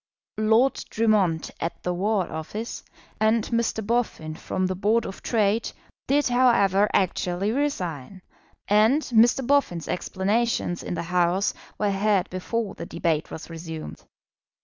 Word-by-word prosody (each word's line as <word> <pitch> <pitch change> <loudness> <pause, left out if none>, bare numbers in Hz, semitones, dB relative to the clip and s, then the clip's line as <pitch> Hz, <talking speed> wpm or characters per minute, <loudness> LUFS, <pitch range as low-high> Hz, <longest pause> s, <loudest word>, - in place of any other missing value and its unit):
Lord 225 +5 +3
Drummond 205 -8 +1
at 165 - -4
the 180 - -1
War 195 +1 0
Office, 205 +9 -5 0.4
and 220 +1 +3
Mr. 230 -2 -1
Boffin 220 -9 -1
from 185 +3 -3
the 185 - 0
Board 210 +5 +1
of 195 - -7
Trade, 220 -1 +1 0.4
did, 285 +2 +3
however, 210 -5 +4
actually 185 +1 0
resign; 185 - -3 0.4
and 220 +9 +4
Mr. 240 +2 +3
Boffin's 265 - +1
explanations 190 +1 -1
in - - -4
the - - -3
House 180 +3 +1 0.2
were 210 -1 +1
heard 195 -1 +1
before 205 +4 -3
the - - -8
debate 165 -2 -1
was 160 - -8
resumed. 165 -1 -8
200 Hz, 130 wpm, -25 LUFS, 180-230 Hz, 0.4 s, however